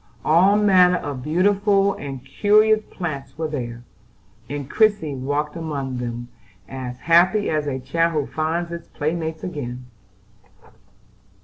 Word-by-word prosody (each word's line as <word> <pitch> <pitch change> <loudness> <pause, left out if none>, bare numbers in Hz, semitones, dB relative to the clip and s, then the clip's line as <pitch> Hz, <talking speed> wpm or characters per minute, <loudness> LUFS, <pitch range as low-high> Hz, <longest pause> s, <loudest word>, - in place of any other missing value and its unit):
All 180 +6 +5
manner 185 -3 +5
of 140 -5 -5
beautiful 195 - +2
and 135 -5 -7
curious 215 +7 +3
plants 140 -6 -6
were 160 0 -2
there; 120 -5 -5 0.7
and 145 -1 -4
Christie 205 -6 +2
walked 145 +3 -2
among 140 -6 -4
them, 120 0 -5 0.4
as 130 -2 -6
happy 180 +5 +4
as 155 -2 -1
a 135 -2 -2
child 165 +6 0
who 150 -3 0
finds 165 +2 -1
its 170 0 -7
playmates 160 +1 -3
again. 125 -7 -5
155 Hz, 125 wpm, -22 LUFS, 135-180 Hz, 0.7 s, All